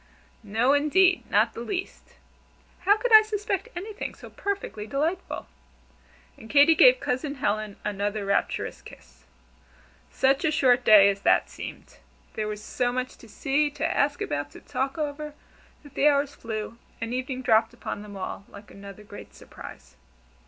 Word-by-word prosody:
"No, 225 +5 +1
indeed 350 +6 +3
not 220 +2 +3
the - - -8
least. 365 +10 -6 0.7
How 410 +2 +5
could 480 +1 -1
I 435 - +11
suspect 415 -3 -3
anything 410 +5 -6
so - - -13
perfectly 395 - -4
delightful?" 315 - -2 0.9
And 220 - -13
Katy 290 +4 +6
gave - - +6
Cousin 280 - -2
Helen 215 -4 -2
another 205 0 -2
rapturous 200 - -1
kiss. - - -16 0.8
Such 270 +1 +1
a 315 - +3
short 255 -5 +3
day 210 -3 +8
as 200 0 -7
that - - +2
seemed! - - -10 0.3
There 215 -1 -3
was 210 0 -6
so 245 +2 -1
much 255 +1 -3
to 230 - -16
see, 290 +5 0
to 290 +2 -4
ask 290 -3 0
about, 145 0 -3
to - - -11
talk 270 +2 -3
over, 300 0 -4 0.5
that 290 - -15
the 295 - +3
hours 285 -1 +2
flew, 220 0 -6 0.2
and 230 +1 -4
evening 255 0 -3
dropped 225 -1 +3
upon 240 -3 -6
them 205 -1 -10
all 195 +1 -6
like 205 0 -14
another 200 +1 -11
great 205 0 -12
surprise. - - -13
255 Hz, 160 wpm, -26 LUFS, 215-300 Hz, 0.9 s, I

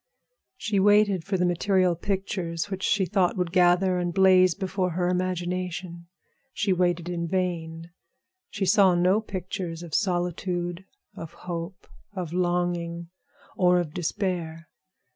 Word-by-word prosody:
She 210 -2 -1
waited 205 -2 +4
for 195 +1 -1
the 180 - +1
material 180 0 +2
pictures 185 -1 -3
which 190 0 -4
she 195 -1 +2
thought 190 -1 +1
would 180 -2 -1
gather 180 0 +3
and 175 0 -1
blaze 185 -1 +5
before 185 -2 -2
her 175 +1 0
imagination. 180 -1 -3 0.5
She 200 -3 +1
waited 175 -1 0
in 170 -1 -3
vain. 165 -2 -3 0.6
She 200 -2 -2
saw 190 -1 +5
no 185 +5 +3
pictures 185 -4 -5
of 165 -3 -10
solitude, 175 -1 -1 0.3
of 165 - -8
hope, 175 0 -7 0.3
of 180 -4 -5
longing, 175 -1 -1 0.5
or 180 -1 +4
of 160 -4 -4
despair. 170 -3 -3
180 Hz, 130 wpm, -26 LUFS, 175-190 Hz, 0.6 s, blaze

